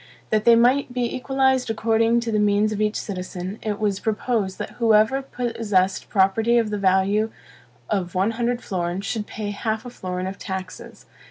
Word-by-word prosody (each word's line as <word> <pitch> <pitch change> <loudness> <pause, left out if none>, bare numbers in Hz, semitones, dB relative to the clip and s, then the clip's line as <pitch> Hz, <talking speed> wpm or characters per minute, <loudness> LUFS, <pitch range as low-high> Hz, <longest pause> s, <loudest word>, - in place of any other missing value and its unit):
That 215 -1 +1
they 235 - +8
might 250 +3 +3
be 245 -1 -1
equalized 265 -1 +1
according 225 +1 +2
to 230 -1 -3
the 215 - +1
means 210 +1 +2
of 215 0 -2
each 215 0 +1
citizen, 185 0 -5
it 210 -2 -2
was 205 -2 0
proposed 215 -3 -1
that - - -7
whoever 225 +4 +4
possessed 220 -8 -1
property 220 +4 +3
of 225 -2 +1
the 210 - -2
value 195 +3 +2 0.6
of 185 -4 -2
one 195 +4 +2
hundred 240 +1 -2
florins 180 +1 -3
should 215 -3 -3
pay 205 -1 -5
half 220 +2 -3
a 245 - -7
florin 185 -4 -4
of 190 +1 -6
taxes. 190 -2 -7
215 Hz, 175 wpm, -23 LUFS, 195-235 Hz, 0.6 s, they